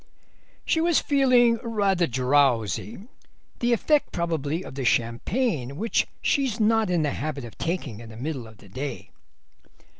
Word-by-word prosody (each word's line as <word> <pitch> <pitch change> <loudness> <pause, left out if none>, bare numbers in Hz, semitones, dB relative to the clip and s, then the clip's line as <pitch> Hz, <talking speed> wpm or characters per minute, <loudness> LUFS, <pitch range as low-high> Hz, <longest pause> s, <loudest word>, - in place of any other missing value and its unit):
"She 320 - +2
was 335 -1 +3
feeling 250 -4 +4
rather 200 -7 +1
drowsy, 130 - +1 0.6
the 240 0 +1
effect 290 +6 +2
probably 165 -1 -2
of - - -9
the 135 0 -4
champagne, 130 - 0
which 225 +5 0 0.2
she's 265 -6 +1
not 220 -1 +3
in 175 -3 +1
the 145 - 0
habit 145 -3 -4
of 115 - -11
taking 165 - -3
in 115 -1 -10
the 110 - -11
middle 130 -2 -4
of 110 -1 -15
the 105 - -17
day." 135 +8 -6
165 Hz, 150 wpm, -25 LUFS, -, 0.6 s, feeling